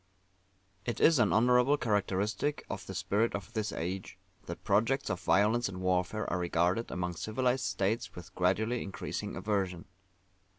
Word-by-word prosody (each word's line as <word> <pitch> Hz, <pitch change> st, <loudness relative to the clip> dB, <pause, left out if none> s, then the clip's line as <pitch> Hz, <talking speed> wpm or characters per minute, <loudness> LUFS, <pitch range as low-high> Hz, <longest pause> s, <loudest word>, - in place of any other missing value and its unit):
It 120 Hz, -, -3 dB
is 160 Hz, -4 st, +5 dB
an 110 Hz, -4 st, +4 dB
honourable 125 Hz, +5 st, +4 dB
characteristic 105 Hz, +4 st, -1 dB
of -, -, -6 dB
the -, -, -6 dB
Spirit 110 Hz, +4 st, +1 dB
of 100 Hz, +3 st, -7 dB
this 110 Hz, -3 st, -1 dB
Age, 95 Hz, +3 st, -4 dB, 0.3 s
that -, -, -7 dB
projects 115 Hz, +7 st, +1 dB
of 90 Hz, -, -2 dB
violence 110 Hz, +4 st, +3 dB
and 95 Hz, -1 st, -7 dB
warfare 95 Hz, +3 st, 0 dB
are 90 Hz, -, -1 dB
regarded 90 Hz, +5 st, +1 dB
among 90 Hz, -1 st, -3 dB
civilized 125 Hz, +5 st, 0 dB
states 95 Hz, +4 st, -1 dB
with 90 Hz, +1 st, -10 dB
gradually 110 Hz, +7 st, +1 dB
increasing 100 Hz, -, -5 dB
aversion. 95 Hz, -5 st, -2 dB
105 Hz, 145 wpm, -31 LUFS, 95-115 Hz, 0.3 s, is